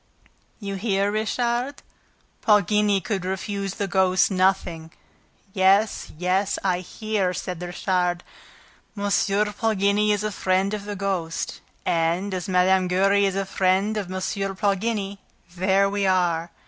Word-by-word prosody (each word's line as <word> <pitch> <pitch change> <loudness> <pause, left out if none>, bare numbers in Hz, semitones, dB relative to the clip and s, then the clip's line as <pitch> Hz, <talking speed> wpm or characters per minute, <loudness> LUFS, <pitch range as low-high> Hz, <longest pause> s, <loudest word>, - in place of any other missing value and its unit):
"You 200 -2 -4
hear, 200 -1 0
Richard: 240 +5 -1 0.6
Poligny 210 -1 +3
could 195 -3 -3
refuse 195 +1 -3
the 200 - -2
ghost 190 +1 +3
nothing." 185 -4 0 0.6
"Yes, 195 +3 +2
yes, 185 +3 0
I 180 -2 +1
hear!" 195 -1 -2
said 180 -2 -5
Richard. 180 0 -1 0.7
"M. 200 - -4 0.5
Poligny 210 -1 +1
is 205 0 0
a 215 - -1
friend 190 +1 0
of 205 -1 -4
the 205 0 -5
ghost; 185 -4 -3 0.2
and, 170 +4 0
as 185 +1 -4
Mme. 185 0 +3
Giry 195 +2 +3
is 195 - -2
a 195 0 -1
friend 190 +3 +1
of 200 -4 -4
M. 185 - -3 0.4
Poligny, 200 0 -1 0.4
there 190 +2 +3
we 200 0 0
are! 175 -3 +1
195 Hz, 130 wpm, -24 LUFS, 185-205 Hz, 0.7 s, Poligny